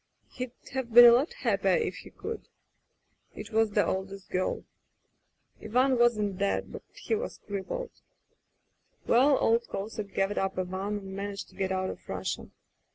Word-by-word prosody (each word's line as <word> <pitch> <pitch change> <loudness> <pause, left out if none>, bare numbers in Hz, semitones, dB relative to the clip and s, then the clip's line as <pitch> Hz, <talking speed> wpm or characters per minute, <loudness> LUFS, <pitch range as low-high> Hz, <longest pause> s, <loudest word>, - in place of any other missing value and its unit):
He'd 250 -1 -5 0.2
have 265 -3 -3
been 240 +2 +10
a 240 - +10
lot 260 - +3
happier - - +1
if 470 -2 -1
he - - -11
could. 455 - -7 0.9
It 210 +1 -8
was 225 0 +3
the 205 0 +2
oldest 190 0 -4
girl... 185 0 -1 1.0
Ivan 255 +5 +3
wasn't 210 -5 +2
dead, 200 0 0
but - - -7
he - - -3
was 445 +3 -2
crippled. 210 - -4 1.1
"Well, 265 +4 +5
old 230 +1 +2
Kosek 200 0 -5
gathered 195 +1 +1
up 195 -1 -2
Ivan 190 +3 -2
and 195 -1 -8
managed 200 0 -5
to - - -20
get 190 -1 -1
out 185 0 -1
of - - -13
Russia. - - -3
210 Hz, 160 wpm, -29 LUFS, 195-240 Hz, 1.1 s, been